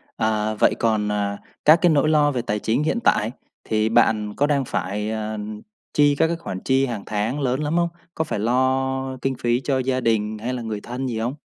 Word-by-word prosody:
Ờ, 110 -1 0
vậy - - +4
còn, 110 -2 +1
à, 100 -1 -1 0.3
các 155 +3 +7
cái 175 - +5
nỗi 155 0 +3
lo 150 -1 +4
về 125 - -1
tài 105 -3 -2
chính 115 +8 0
hiện 195 +9 0
tại, 110 - +2 0.3
thì 110 0 0
bạn 110 -3 +2
có 145 - +2
đang 140 -3 +1
phải, 105 +2 -2
à, 110 0 -3 0.6
chi 145 -1 +4
các 160 - +3
cái 170 - -1
khoản 95 - -6
chi 135 +4 +2
hàng 115 -5 -4
tháng 110 +7 -2
lớn 130 0 0
lắm 150 +2 -1
không? 170 0 +2 0.3
Có 160 - 0
phải 130 -9 -3
lo 130 +2 0
kinh 135 -1 -1
phí 120 +1 0
cho 135 -1 +1
gia 130 0 0
đình 110 -2 0
hay 120 +4 -3
là 125 - -4
người 110 -2 -4
thân 125 +2 -4
gì 115 -3 -3
hông? 120 +4 -1
120 Hz, 225 wpm, -22 LUFS, 110-135 Hz, 0.6 s, các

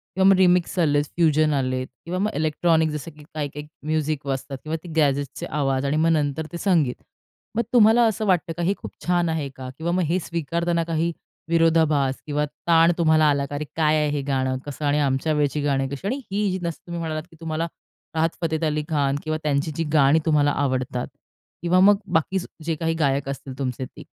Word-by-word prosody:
किंवा 190 0 +4
मग 195 - +7
रिमिक्स 180 -1 +3
आलेत, 145 -3 +3
फ्युजन 155 -2 +3
आलेत 130 -2 -1 0.2
किंवा 180 +2 -3
मग 210 +3 0
इलेक्ट्रॉनिक, 160 +1 +2
जसं 150 +2 -5
की 150 -1 -16
काही-काही 150 -1 -4 0.2
म्युझिक 155 -2 -1
वाजतात 135 0 -3
किंवा 155 +1 -3
ते 175 - -9
गॅजेट्सचे 140 -3 0
आवाज 135 -2 -1
आणि 140 +2 +1
मग 165 +1 +3
नंतर 150 -1 0
ते 175 - -5
संगीत. 165 -9 +2 0.6
मग 235 - +2
तुम्हाला 230 0 +6
असं 220 -1 0
वाटतं 175 -4 +1
का, 175 - -1
हे 185 +4 +2
खूप - - -8
छान 175 -1 +2
आहे 155 -3 -2
का 130 -1 -7
किंवा 165 +2 -2
मग 180 0 +1
हे 170 +4 +1
स्वीकारताना 170 +1 -1
काही 165 0 -1 0.4
विरोधाभास 160 -5 +3
किंवा 150 0 0 0.2
ताण 165 0 +6
तुम्हाला 160 -2 +4
आला 140 -1 +1
का? 145 - -7
"अरे 150 +1 -3
काय 155 -1 +3
आहे 150 -1 +1
हे 145 -1 -1
गाणं, 130 -1 0
कसं 145 +1 -5
आणि 145 +1 +2
आमच्या 140 +2 +1
वेळची 150 0 0
गाणी 135 -2 +1
कशी" 140 +7 -5
आणि 265 +6 -2
ही 200 -2 0
जसं 170 -2 -3
तुम्ही 170 0 -4
म्हणालात, 155 -2 -3
की - - -16
तुम्हाला 165 0 -2 0.5
राहत 160 +1 +2
फतेत 160 -1 -1
अली 150 -1 0
खान 140 -3 +1
किंवा 155 0 -1
त्यांची 150 +1 0
जी 165 - -1
गाणी 145 +1 +5
तुम्हाला 150 -2 +3
आवडतात 130 -2 -1 0.5
किंवा 175 +2 +3
मग 200 +2 +6 0.2
बाकी 165 +4 +2 0.3
जे 165 0 -1
काही 165 +1 -1
गायक 140 -2 +1
असतील 135 -1 -6
तुमचे 130 -1 -2
ते. - - -13
155 Hz, 200 wpm, -23 LUFS, 145-170 Hz, 0.6 s, मग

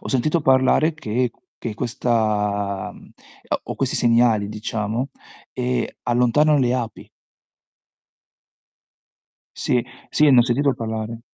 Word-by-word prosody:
ho - - -8
sentito 150 +6 +1
parlare 135 +4 +3
che 125 -4 -1 0.3
che 110 -3 -4
questa 105 -4 -1 0.7
o - - -5
questi - - -1
segnali 115 -3 +3
diciamo, 110 +3 -3 0.4
ehm, 125 0 -1 0.2
allontanano 125 +5 +3
le 125 -2 +2
api. 120 -4 -4 2.5
Sì, 120 -1 0 0.3
sì 150 -1 +4
ne 130 - +6
ho - - +8
sentito 135 +3 +1
parlare. 110 0 -5
120 Hz, 105 wpm, -22 LUFS, 110-130 Hz, 2.5 s, ho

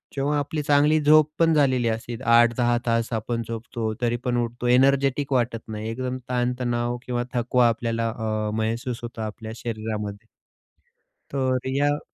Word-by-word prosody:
जेव्हा 145 +2 0
आपली 150 +2 -2
चांगली 150 +2 +4
झोप 150 +1 +5
पण 165 -1 +4
झालेली 130 -5 +3
असते. 115 +1 -3
8-10 120 0 +4
तास 115 0 0
आपण 115 +1 -2
झोपतो 115 -1 -4
तरी 120 0 +1
पण 120 -1 +1
उठतो 120 +1 -4
एनर्जेटिक 135 +2 +3
वाटत 120 -2 +1
नाही 110 0 -5
एकदम 130 +2 -3
ताणतणाव 120 -1 -1
किंवा 120 -1 -1
थकवा 120 0 +3
आपल्याला 115 0 -1
अ, 110 -2 -2
महसूस 115 +2 -2
होतो 115 -1 -6
आपल्या 110 +1 -6
शरीरामध्ये 110 -3 -5 1.0
तर 130 -2 +1 0.2
या 145 +1 +2
120 Hz, 145 wpm, -24 LUFS, 115-130 Hz, 1.0 s, झोप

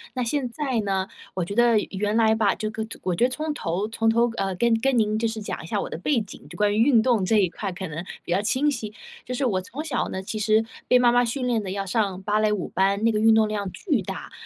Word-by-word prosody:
那 250 - 0
现 255 +1 -1
在 260 -1 -2
呢 195 -2 -1 0.3
我 185 -2 -1
觉 200 - -5
得 235 0 +4
原 205 +2 -1
来 220 -1 +4
吧， 220 -3 +2
这 215 0 -3
个 220 0 -4 0.2
我 185 - 0
觉 205 - +1
得 - - +1
从 305 +4 -3
头 190 - -2
从 225 0 +1
头， 235 +1 +3
呃， 195 -1 -1
跟 235 +5 +2
跟 270 0 +2
您 215 -1 +1
就 230 - +1
是 225 0 -4
讲 - - -5
一 - - -9
下 - - -1
我 - - -3
的 - - -5
背 260 +7 +1
景， 205 - -11
就 175 - -10
关 205 +1 +2
于 - - -1
运 235 -3 +5
动 235 -5 +2
这 215 +4 +2
一 195 -3 +4
块 195 +3 -5
可 185 +1 -6
能 160 +2 -5 0.2
比 - - -7
较 185 +3 +2
清 265 +8 +1
晰。 220 -6 -5 0.3
就 250 - -4
是 270 - 0
我 200 -7 +1
从 260 +11 -7
小 285 -7 -1
呢， 190 - -4
其 210 +3 -5
实 215 +1 +3 0.2
被 250 - +5
妈 245 -1 +5
妈 245 0 +4
训 250 +3 -2
练 235 -3 +1
的 190 - -4
要 195 0 -3
上 195 -2 -1
芭 210 +1 +1
蕾 215 -1 +2
舞 205 -4 -2
班， 195 +2 +1
那 230 - +4
个 210 - 0
运 225 +1 +5
动 220 -1 +4
量 205 -2 -3
巨 290 - -1
大。 190 0 -7
220 Hz, 305 characters per minute, -24 LUFS, 195-240 Hz, 0.3 s, 运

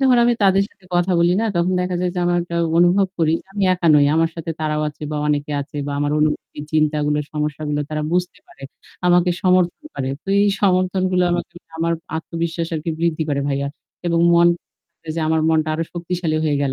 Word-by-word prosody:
যখন 260 -2 +4
আমি 240 - +4
তাদের 195 0 +4
সাথে 195 - -29
কথা 175 +1 +2
বলি 175 +1 +4
না? - - 0
তখন 170 +2 +1
দেখা 180 0 -2
যায় 180 -1 0
যে - - -3
আমার 175 - +2
একটা 170 0 -5 0.2
অনুভব 180 +3 +4
করি 160 -1 +2
যে, - - -46
আমি 200 0 -3
একা 175 -2 0
নই। 145 -1 +5
আমার 165 0 +2
সাথে 165 0 -5
তারাও 155 0 -1
আছে 150 - -13
বা 150 - -3
অনেকে 150 0 -1
আছে 145 +1 -8
বা 145 - -3
আমার 145 0 0
অনুভূতি, 150 -1 -1
চিন্তাগুলো 150 -1 +1
সমস্যাগুলো 150 0 -2
তারা 155 0 -2
বুঝতে 180 0 -1
পারে, 135 - -18 0.4
আমাকে 180 0 +4
সমর্থন 185 - +2
করে। 130 - -3 0.2
তো - - -12
এই 205 - +3
সমর্থনগুলো 185 -1 +2
আমাকে 175 - -3 0.2
আমার 165 +1 0 0.2
আত্মবিশ্বাস 165 0 -3
আরকি 160 +1 -3
বৃদ্ধি 165 -1 0
করে 140 -1 0
ভাইয়া। 140 0 -1 0.4
এবং 170 -1 +2
মন 170 0 +6 0.7
যে 165 - -1
আমার 160 0 +2
মনটা 155 -1 +2
আরো 165 - -1
শক্তিশালী 175 -2 -2
হয়ে 150 -2 +1
গেল। 135 - 0
165 Hz, 200 wpm, -20 LUFS, 150-180 Hz, 0.7 s, মন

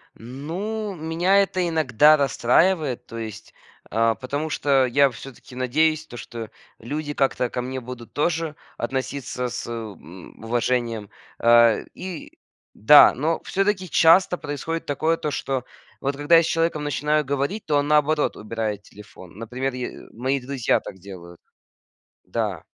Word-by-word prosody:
Ну, 180 - -5
меня 175 +5 +2
это 185 -2 -1
иногда 155 -2 +4
расстраивает, 140 0 +1
то 115 - -8
есть, 110 -2 -8 0.4
э, 115 +1 +2
потому 145 +4 -3
что 140 -3 +2
я 140 +3 +4
всё-таки 130 +1 -12
надеюсь, 155 +5 +1
то 120 - -11
что 115 -2 -8 0.3
люди 145 +5 -5
как-то 135 -3 0
ко 125 - -3
мне 130 +1 -5
будут 120 -1 -10
тоже 160 0 -1 0.2
относиться 130 0 -3
с, - - -5
э, - - -5
м, 100 -5 -10
уважением. 115 -2 -1 0.3
Э, 115 -1 +5
и 180 -3 -8 0.4
да, 145 +8 +8
но 160 +5 -1
всё-таки 195 -2 -1
часто 180 +2 +5
происходит 160 +2 -4
такое, 155 +3 0
то 150 - -3
что 135 -2 -2 0.4
вот 140 0 -2
когда 145 +4 +3
я 165 - +5
с - - -1
человеком 165 -2 0
начинаю 150 +1 0
говорить, 140 +10 -2
то 150 -2 +1
он, 145 0 0
наоборот, 150 0 +2
убирает 110 -2 -4
телефон. 100 -5 -14
Например, 125 +4 -4
е 125 -1 -7
мои 130 +4 -1
друзья 130 -1 0
так 95 - -10
делают. 85 -2 -11 0.9
Да. - - -3
135 Hz, 145 wpm, -23 LUFS, 120-155 Hz, 0.9 s, да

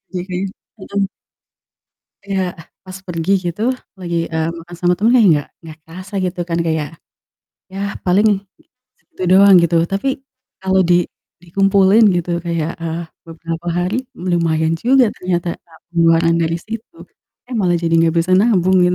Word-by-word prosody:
jadi 180 +1 -3 0.3
mhm. 200 +1 -2 1.2
Ya, 190 -2 -2
ah, 160 -2 -13 0.2
pas 185 - -8
pergi 170 0 -3 0.2
gitu 210 - -9 0.4
lagi, 175 -2 -4 0.2
eee, 160 0 -1
makan 175 +1 -11
sama 180 0 +2
temen 215 +5 +2 0.2
nggak 145 - -3
nggak 160 -2 -12
kerasa 185 +5 -11
gitu 180 0 -3
kan 170 - -2
kayak, 160 0 -2 0.8
yah 195 +1 -4
paling 195 +4 +3 0.7
segitu - - -12
doang 195 +1 +7
gitu 170 0 +2
tapi 195 +9 -2 0.5
kalo 190 0 +1
di - - +6 0.5
dikumpulin 195 +4 +3
gitu 175 0 -2 0.2
kayak, 165 -1 -1
eee, 165 +1 -3 0.2
beberapa 165 +1 -7
hari 180 +6 -1 0.2
lumayan 165 -3 0
juga 255 +1 +5
ternyata, 175 -1 -2
eee, 165 -1 -20 0.2
pengeluaran 165 0 +3
dari 165 +1 0
situ, 225 +9 -8 0.5
eh, 250 - -7
malah 175 -2 +2
jadi 165 0 +1 0.2
gak - - -6
bisa - - -3
nabung 190 -4 +3
kan. 180 0 +3
180 Hz, 145 wpm, -18 LUFS, 165-195 Hz, 1.2 s, doang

